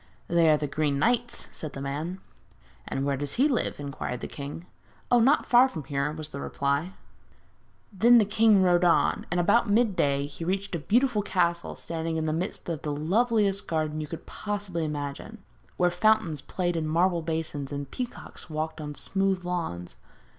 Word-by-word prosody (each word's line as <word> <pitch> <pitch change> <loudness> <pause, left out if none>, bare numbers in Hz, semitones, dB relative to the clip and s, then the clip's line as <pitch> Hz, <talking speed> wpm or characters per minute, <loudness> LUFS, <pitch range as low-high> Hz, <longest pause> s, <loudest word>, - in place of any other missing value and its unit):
'They 170 -1 +4
are 155 - +5
the 150 - -2
Green 145 0 0
Knight's,' 240 - 0
said 155 -3 -6
the - - -6
man. 150 +7 -4 0.7
'And 135 - -2
where 140 -1 +1
does 145 0 -1
he 265 +5 +4
live?' 255 - 0
inquired 140 -3 -5
the - - -4
king. 145 +4 -7 0.5
'Oh, 245 - +6
not 270 +6 +4
far 250 +2 +6
from 160 - -6
here,' 140 0 -1
was 155 0 -6
the 140 -1 -7
reply. 140 +6 -1 1.0
Then 235 +5 +6
the 220 - +5
king 210 -1 +4
rode 175 -1 +4
on, 175 -1 +2
and 175 - 0
about 220 +6 +3
midday 185 -11 +2
he 145 +3 -8
reached 195 +3 -2
a 170 - -1
beautiful 230 - +2
castle 175 -4 0
standing 165 0 -4
in 160 - -1
the 155 - 0
midst 175 +5 -4
of 165 -4 -3
the 150 - -3
loveliest 200 +6 +1
garden 155 -1 -1
you 150 - -5
can 165 - -7
possibly 205 -5 -4
imagine, 145 +8 -5 0.4
where 180 -1 +3
fountains 175 -5 +2
played 175 +1 -2
in 160 -1 -1
marble 170 +2 +2
basins, 160 -3 -3
and 140 -1 -5
peacocks 245 -7 -7
walked 155 0 -3
on 150 -1 -5
the - - -12
smooth 195 -2 0
lawns. 165 - -4
170 Hz, 185 wpm, -27 LUFS, 150-200 Hz, 1.0 s, Oh